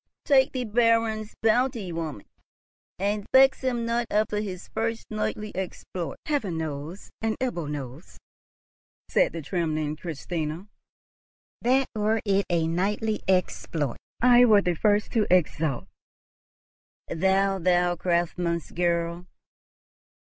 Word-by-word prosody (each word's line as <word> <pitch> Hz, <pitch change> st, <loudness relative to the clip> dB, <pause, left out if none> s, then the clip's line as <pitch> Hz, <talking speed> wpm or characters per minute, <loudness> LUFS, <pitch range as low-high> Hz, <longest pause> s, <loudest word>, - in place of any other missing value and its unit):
Take 270 Hz, -2 st, +4 dB
the 255 Hz, -1 st, -1 dB
Baron's 225 Hz, -1 st, +1 dB
bounty, 225 Hz, -3 st, +2 dB
woman, 160 Hz, -10 st, -5 dB, 0.7 s
and 205 Hz, +2 st, -1 dB
vex 265 Hz, +1 st, +6 dB
him 245 Hz, -3 st, -1 dB
not 235 Hz, 0 st, 0 dB
after 210 Hz, 0 st, +1 dB
his 190 Hz, -4 st, -5 dB
first 225 Hz, 0 st, -2 dB
knightly 215 Hz, -1 st, -3 dB
exploit." 180 Hz, -3 st, -5 dB
"Heaven 225 Hz, -, -1 dB
knows, 155 Hz, +3 st, -6 dB
and 225 Hz, 0 st, -1 dB
Ebbo 175 Hz, -, -2 dB
knows," 140 Hz, +2 st, -7 dB, 0.9 s
said -, -, +3 dB
the 165 Hz, -2 st, -6 dB
trembling 155 Hz, -2 st, -1 dB
Christina, 160 Hz, +2 st, -4 dB, 0.9 s
"that, 265 Hz, +2 st, +3 dB
were 215 Hz, +1 st, +1 dB
it 200 Hz, -1 st, +2 dB
a 170 Hz, -2 st, +2 dB
knightly 205 Hz, +6 st, -1 dB
exploit, 165 Hz, -7 st, 0 dB, 0.3 s
I 245 Hz, 0 st, +7 dB
were 210 Hz, -4 st, +6 dB
the 180 Hz, -, +1 dB
first 205 Hz, +4 st, +1 dB
to 220 Hz, -3 st, +1 dB
exult." 155 Hz, -, +1 dB, 1.2 s
"Thou! 190 Hz, +3 st, +1 dB
thou 175 Hz, 0 st, +2 dB
craftsman's 170 Hz, -1 st, -1 dB
girl! 170 Hz, 0 st, -1 dB
190 Hz, 115 wpm, -26 LUFS, 170-220 Hz, 1.2 s, I